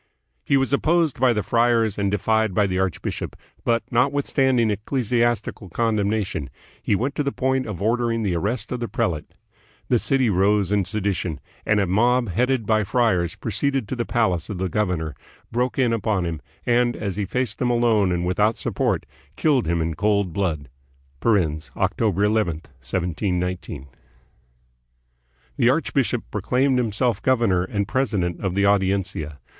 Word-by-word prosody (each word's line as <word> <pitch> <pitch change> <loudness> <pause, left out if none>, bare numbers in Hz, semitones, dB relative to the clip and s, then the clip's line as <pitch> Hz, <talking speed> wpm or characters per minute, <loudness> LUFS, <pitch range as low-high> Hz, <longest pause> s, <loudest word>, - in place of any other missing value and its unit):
He 140 - +3
was 135 +1 0
opposed 160 0 +2
by 130 0 +4
the 105 -3 0
friars 115 -3 +2
and 100 -1 +1
defied 110 0 +1
by 105 - +4
the 95 -1 -1
archbishop, 95 -3 -3 0.3
but, 115 -1 +1
notwithstanding 130 -2 +2
ecclesiastical 115 -2 -1
con 115 +5 0
demnation, 100 -8 -1 0.3
he 105 - +1
went 130 +7 -1
to 150 - -1
the 140 -1 -1
point 130 -2 0
of 100 -3 -5
ordering 115 0 +1
the 95 -4 0
arrest 105 +6 -2
of 125 - -2
the 120 - -3
prelate. 80 -8 -2 0.5
The 120 - +4
city 135 0 +1
rose 100 0 +2
in 100 -2 +2
sedition, 95 -5 -2 0.3
and 105 -1 +3
a 100 - +2
mob, 120 +5 +2
headed 125 +5 +1
by 110 0 +2
friars, 95 -6 +1
proceeded 135 +1 -1
to - - -2
the 120 - -1
palace 95 -8 0
of 105 - -4
the 95 +1 -2
governor, 90 -6 -1 0.4
broke 125 +2 -1
in 125 -3 +2
upon 105 -4 0
him, 80 -3 -4 0.2
and, 120 0 +2
as 100 -4 -4
he 105 0 -1
faced 125 +1 -2
them 125 - +1
alone 115 -5 +3
and 90 0 -1
without 105 +5 +2
support, - - -1 0.3
killed 140 - +2
him 85 0 +1
in 80 0 -2
cold 100 0 +1
blood 80 -8 -1 0.6
(October 95 +2 0
11, 105 -4 +2
1719). 90 - -3 1.7
The - - +4
archbishop - - +1
proclaimed 130 0 +1
himself 115 -1 0
governor 115 -9 +2
and 100 +1 -2
presi 130 -5 0
dent 85 -1 -2
of 95 -2 -1
the 100 0 +2
Audiencia. 95 -6 0
105 Hz, 160 wpm, -23 LUFS, 95-120 Hz, 1.7 s, by